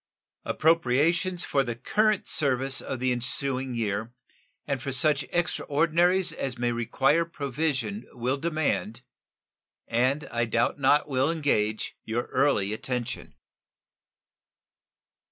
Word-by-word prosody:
Appropriations 165 +4 +2
for 140 - +1
the 120 -3 -4
current 210 - +1
service 135 -2 +1
of 130 - -5
the 130 0 +1
ensuing 130 +1 -1
year 110 0 -2 0.5
and 140 -3 -2
for 135 - -4
such 140 +1 +3
extraordinaries 175 +2 +2
as 135 -5 -3
may 120 0 0
require 135 +7 +1
provision 160 - -3
will 125 +3 -1
demand, 130 - -2 0.8
and 130 +5 0
I 120 0 0
doubt 115 +4 0
not 145 +2 +3
will 135 +1 +1
engage, 110 -10 0
your 115 +2 -2
early 130 -7 +2
attention. 125 +1 -4
135 Hz, 110 wpm, -27 LUFS, 120-155 Hz, 0.8 s, such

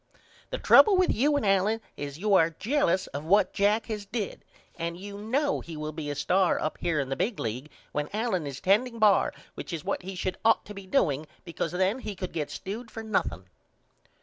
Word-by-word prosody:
The - - -3
trouble 410 -3 +7
with 370 - +3
you 290 +6 +2
and 255 - -1
Allen 195 +3 +2 0.2
is 145 0 -6
you 205 +4 +1
are 165 -4 +5
jellous 210 - +1
of 140 +1 -4
what 200 +6 +3
Jack 210 +2 +2
has 215 -2 -4
did 215 -2 -4 0.3
and 170 0 -4
you 200 +2 -8
know 270 +8 0
he 165 -2 -8
will 155 0 -4
be 155 -1 -5
a 145 - -3
star 180 +5 +2
up 155 - -3
here 170 -3 0
in 135 -1 -2
the 135 - -1
big 210 - -1
league 125 +7 -4 0.2
when 150 0 -2
Allen 205 -7 -1
is 135 -2 -6
tending 230 +5 +2
bar 210 -3 +4 0.2
which - - -7
is 165 -1 -5
what 200 - -1
he 190 +1 -7
should 185 0 -3
ought 225 0 +4
to 210 - -9
be 200 -1 -10
doing 155 - +1 0.2
because 170 -1 -3
then 190 +7 +1
he 210 -5 -6
could 185 -1 -5
get 150 -3 -2
stewed 220 +5 -6
for 225 0 -7
nothing. 205 - -1
195 Hz, 215 wpm, -28 LUFS, 160-220 Hz, 0.3 s, trouble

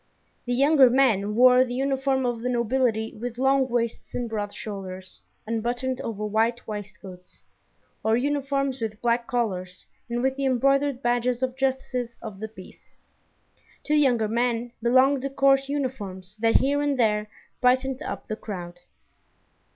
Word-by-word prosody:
The 245 - 0
younger 275 0 +6
men 220 -6 +2
wore 250 +1 +7
the 245 -1 -4
uniform 270 0 0
of 240 -2 -2
the 250 - -2
nobility 235 -2 0
with 235 +2 -6
long 265 0 +2
waists 235 -1 -2
and 245 - -2
broad 210 -2 -3
shoulders, 190 -3 -8 0.2
unbuttoned 245 +3 -2
over 210 -2 -4
white 225 +3 0
waistcoats, 190 -3 -9 0.6
or 220 +1 +3
uniforms 275 -1 -1
with 215 -1 -4
black 235 0 0
collars 185 -8 -3 0.2
and 240 +1 -2
with 265 0 0
the 275 - -1
embroidered 275 +1 +2
badges 245 +1 0
of 255 -1 -1
justices 260 -3 -2
of 210 -4 -8
the 220 - -4
peace. 190 -4 -15 0.9
To 300 - -1
the 300 - +5
younger 245 -6 +3
men 235 +1 -1
belonged 260 +3 +4
the 275 - -3
court 275 0 +3
uniforms 210 -9 -4
that 225 0 +2
here 285 +2 +3
and 290 -2 0
there 210 -3 +1 0.3
brightened 260 +2 +2
up - - -5
the 215 - -3
crowd. 175 -5 -7
245 Hz, 150 wpm, -25 LUFS, 220-265 Hz, 0.9 s, wore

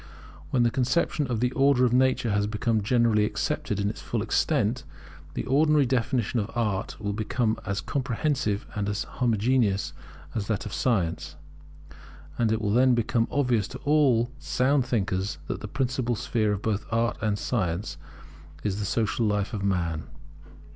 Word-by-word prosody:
When 125 - +2
the 120 - +3
conception 140 +3 +1
of 120 -3 -2
the 125 0 +2
Order 135 -1 +4
of 120 - +1
Nature 130 -3 +2
has 100 0 +1
become 110 +1 0
generally 115 -1 +3
accepted 105 -1 -1
in 100 - 0
its 105 - -4
full - - -2
extent, 120 +5 +1 0.5
the - - -2
ordinary 150 +2 +4
definition 125 -2 0
of 105 0 -2
Art 105 -3 -1
will 100 -1 -2
become 110 +1 -1
as 100 -1 -1
comprehensive 125 -5 -1
and 100 -1 -2
as 105 +1 -1
homogeneous 110 -7 +1 0.4
as 105 -3 -3
that 110 -3 -1
of 105 - -6
Science; 85 -10 0 1.0
and 115 -2 +2
it 110 - +1
will 105 - +1
then 125 +1 +5
become 115 0 +1
obvious 125 -7 +1
to 130 - -8
all 135 -6 +3
sound 135 0 +1
thinkers 95 -5 -1
that - - -4
the 105 - -5
principal 125 0 -1
sphere 110 -1 0
of 100 -1 -3
both 110 -1 -1
Art 115 0 0
and 105 -2 0
Science 95 -5 -2 0.7
is 100 -1 -1
the 105 - -2
social 110 +1 0
life 105 +2 -1
of 100 -3 -3
man. 85 -5 -1
115 Hz, 165 wpm, -26 LUFS, 100-125 Hz, 1.0 s, then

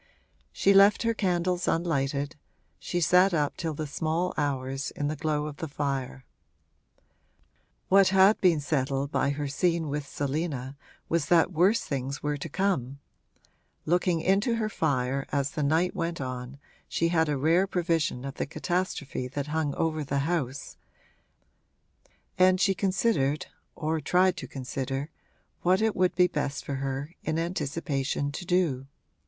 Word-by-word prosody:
She 195 - +3
left 200 +3 +6
her 230 0 +2
candles 180 -3 0
unlighted 145 -3 0 0.4
she 175 - -2
sat 180 +3 +4
up 145 -2 0
till 160 -3 -3
the 155 - -3
small 160 +4 -1
hours, 135 -2 -2
in 145 0 -3
the 155 - -2
glow 150 0 -1
of 150 -1 -6
the 160 - -4
fire. 135 -3 -3 1.6
What 195 0 +6
had 190 +2 +5
been 175 -5 +4
settled 140 -1 -1
by 140 - +1
her 145 +1 -2
scene 165 +2 0
with 145 0 -3
Selina 140 -2 -3 0.3
was 165 -3 0
that 170 +2 +4
worse 185 +8 +3
things 135 0 -4
were 150 0 0
to 145 +3 -6
come 145 -8 -1 0.9
(looking 175 0 +1
into 200 +7 +2
her 220 -2 -1
fire, 135 -6 -1
as 140 -1 0
the 150 - -3
night 160 +5 +1
went 170 0 -2
on, 130 0 -5 0.3
she 165 - 0
had 160 -2 +2
a 145 - 0
rare 165 +7 +3
prevision 165 -8 0
of 135 - -5
the - - -3
catastrophe 165 -5 -2
that 140 +2 -4
hung 155 -3 0
over 155 -1 -1
the 140 0 -1
house), 145 -6 -3 1.6
and 185 0 +5
she 195 +1 +3
considered, 185 -7 +1 0.3
or 160 0 -1
tried 180 +5 +3
to - - -6
consider, 135 +2 -4 0.5
what 185 +2 +3
it 220 -1 +1
would 185 0 +2
be 180 0 +5
best 145 -5 -3
for 140 - -3
her, 135 +3 -4
in 155 0 -1
anticipation, 145 -4 -2
to 160 - -6
do. 165 -8 +1
155 Hz, 150 wpm, -27 LUFS, 140-180 Hz, 1.6 s, left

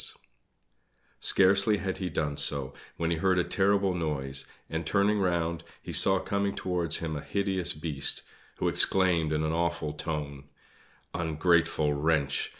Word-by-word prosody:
Scarcely 100 +2 +4
had 95 0 -3
he 95 -2 -3
done 75 -2 -2
so 70 -2 -1 0.2
when 85 0 -1
he 85 - 0
heard 95 +2 +2
a 90 - +3
terrible 100 0 +1
noise, 70 -6 -2 0.2
and, 80 +1 -3
turning 100 +5 +1
round, 85 -3 -1 0.2
he - - -8
saw 95 0 +6
coming 100 +1 -2
towards 90 -3 0
him 80 -2 -4
a 75 - -4
hideous 95 -2 0
Beast, 75 -2 -2 0.3
who - - -2
exclaimed 90 -5 +2
in 75 0 0
an 80 - 0
awful 85 -2 -1
tone: 75 -3 -5 0.7
"Ungrateful 80 -2 +1
wretch! 75 -1 0
85 Hz, 145 wpm, -28 LUFS, 75-95 Hz, 0.7 s, saw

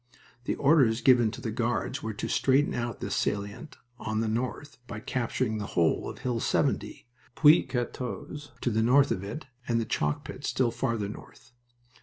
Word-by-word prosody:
The - - 0
orders 135 -6 +4
given 120 -4 +5
to - - -8
the 115 - -3
Guards 120 +3 -1
were 110 -2 -4
to - - -3
straighten 135 +2 +2
out 120 -2 -3
this - - -3
salient 105 +8 -3 0.2
on 110 0 -2
the 115 - 0
north 125 +5 -3
by - - -6
capturing 115 -1 -1
the 100 - -4
whole 85 -2 +2
of - - -8
Hill 125 -2 -2
70, - - -1 0.3
Puits 155 +2 +6
14, 125 +3 -4 0.2
to - - +1
the 110 +1 +1
north 135 +5 +4
of 95 - -1
it, 115 +9 -6 0.2
and 115 -1 +2
the 115 - -1
chalk 75 -10 -1
pit - - -8
still 125 -3 +1
farther 115 -3 -1
north. 110 +3 -11
120 Hz, 180 wpm, -28 LUFS, 110-130 Hz, 0.3 s, Puits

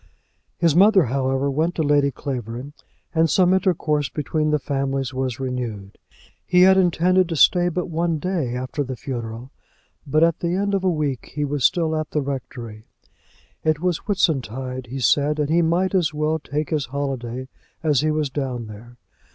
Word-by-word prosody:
His 165 -3 +2
mother, 195 +1 +6
however, 135 +2 0
went 160 +5 0
to 160 - 0
Lady 145 -1 +3
Clavering, 125 0 -6 0.4
and 160 0 +3
some 180 +3 +4
intercourse 155 -6 +1
between 155 +1 -1
the 150 - +3
families 135 -2 -2
was 130 -2 -2
renewed. 120 -7 -5 0.4
He 180 0 +3
had 190 0 +7
intended 180 0 +3
to 165 - -2
stay 175 +3 +4
but 180 +1 -2
one 170 0 -1
day 155 -7 -2
after 130 +3 -3
the 130 -1 -5
funeral, 120 -1 -6 0.6
but 155 +3 +3
at 165 -1 +2
the 170 +1 -1
end 200 +1 0
of 195 -1 0
a 185 - +3
week 150 -7 -2
he 150 -1 0
was 145 -2 -2
still 160 +1 +2
at 155 -1 -2
the 150 - -1
rectory. 120 -5 -6 0.8
It 155 -1 +1
was 180 -1 0
Whitsuntide 130 - -1
he 130 +3 -6
said, 145 +3 +2
and 150 0 -1
he 170 +1 +4
might 175 +4 +1
as 165 -5 +1
well 155 +1 0
take 150 0 -4
his 150 -5 0
holiday 130 -2 -4 0.4
as 150 -4 +3
he 155 - +1
was 155 -2 -1
down 130 -4 -3
there. 110 +3 -12
145 Hz, 175 wpm, -22 LUFS, 130-165 Hz, 0.8 s, had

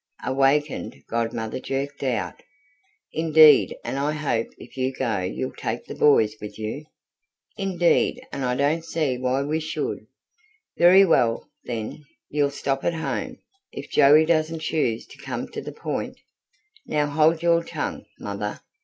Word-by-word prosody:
Awakened, 135 +2 +1
Godmother 115 0 -2
jerked 140 +2 -4
out: 125 -6 -2 0.7
"Indeed 155 -2 +6
and 135 - -3
I 145 +2 0
hope 140 -7 -1
if - - -13
you 130 0 0
go 120 -6 -1
you'll 90 0 -3
take - - -4
the - - -7
boys 110 -8 +4
with 105 - -8
you!" 110 +8 -5 0.7
"Indeed 185 -4 +1
and 140 - -4
I 125 -1 0
don't 150 +5 +1
see 155 -6 -1
why 130 +2 0
we 155 +3 -1
should!" 160 0 -4 0.7
"Very 185 +3 +7
well, 115 -9 +2
then, 115 +5 -5 0.3
you'll 145 -1 +2
stop 135 -1 -2
at 170 - 0
home. 160 - -3 0.3
If - - -8
Joey 150 +3 +6
doesn't 160 0 +1
choose 120 -9 -1
to - - -16
come - - -4
to - - -6
the - - -7
point - - -4 0.4
" 430 +1 -33
"Now 150 -1 +1
hold 155 +3 +2
your 170 0 +3
tongue, - - -5
mother!" 105 0 -5
140 Hz, 150 wpm, -24 LUFS, 125-160 Hz, 0.7 s, Very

